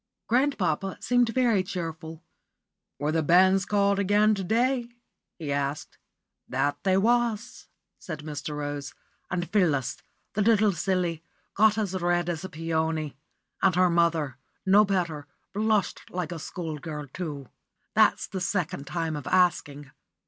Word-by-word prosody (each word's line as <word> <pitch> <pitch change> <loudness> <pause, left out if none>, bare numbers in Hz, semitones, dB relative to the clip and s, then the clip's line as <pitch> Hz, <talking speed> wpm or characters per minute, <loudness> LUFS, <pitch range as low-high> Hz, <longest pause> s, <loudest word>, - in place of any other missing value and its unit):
Grandpapa 200 - 0
seemed 245 -1 +2
very 235 -5 +2
cheerful. 165 -3 -6 0.7
"Were 145 +2 -1
the 160 0 +1
banns 185 +4 +4
called 200 -1 +2
again 205 +2 +4
to 195 -2 -2
day?" 240 +4 +1 0.5
he 155 -4 -4
asked. 140 +1 -3 0.5
"That 145 0 0
they 190 -1 +3
was," 235 +2 0 0.3
said 155 -4 -6
Mr. 150 0 -5
Rose; 145 -1 -5 0.3
"and 175 0 -2
Phyllis, 155 - +1 0.4
the 210 - 0
little 215 -1 +4
silly, 175 -2 -1 0.3
got 215 +1 +4
as 205 -4 -1
red 175 -1 0
as 165 -1 -3
a 190 - -5
peony, 160 -2 -2 0.5
and 190 -3 +3
her 180 -1 +4
mother, 165 -6 +1 0.3
no 200 +2 +6
better, 170 -7 -2 0.3
blushed 215 0 0
like 180 -2 -4
a 170 - -5
school 160 -1 -5
girl, 150 -2 -6
too. 145 -3 -6 0.4
That's - - +4
the 190 - -6
second 180 -5 -2
time 165 -2 -2
of 145 -3 -6
asking. 145 -6 +1
175 Hz, 140 wpm, -27 LUFS, 155-200 Hz, 0.7 s, no